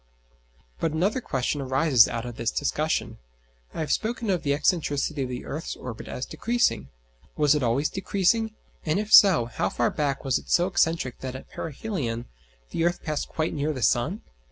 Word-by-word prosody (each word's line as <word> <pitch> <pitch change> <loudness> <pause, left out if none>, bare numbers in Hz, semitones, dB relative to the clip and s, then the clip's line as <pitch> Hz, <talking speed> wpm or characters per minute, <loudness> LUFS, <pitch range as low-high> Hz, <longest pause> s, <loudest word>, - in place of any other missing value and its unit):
But 160 - 0
another 195 +10 +1
question 135 - -1
arises 130 -2 +4
out 115 0 -4
of 120 -1 -6
this 115 0 -1
discussion. 155 +3 -1 0.5
I - - -5
have 155 - -2
spoken 225 -1 -1
of 180 - 0
the 140 - -3
excentricity 145 -1 0
of 130 - -2
the 125 0 -5
earth's 155 +3 -5
orbit 120 -3 -8
as 125 - -4
decreasing. 235 - 0 0.5
Was 150 -1 +4
it 150 - 0
always 125 +5 +1
decreasing? 215 +3 0 0.3
and 155 +1 0
if 210 +1 -2
so, 185 - +8
how 120 - -2
far 120 - 0
back 140 -2 -2
was 135 - +2
it - - -16
so 175 - +4
excentric 165 -8 +1
that 130 -1 -5
at 130 - -10
perihelion 145 - -4 0.5
the 165 - -1
earth 175 +1 0
passed 155 -2 -3
quite 155 0 -2
near 150 +1 -1
the 130 -4 -4
sun? 155 - +1
150 Hz, 180 wpm, -26 LUFS, 130-175 Hz, 0.5 s, so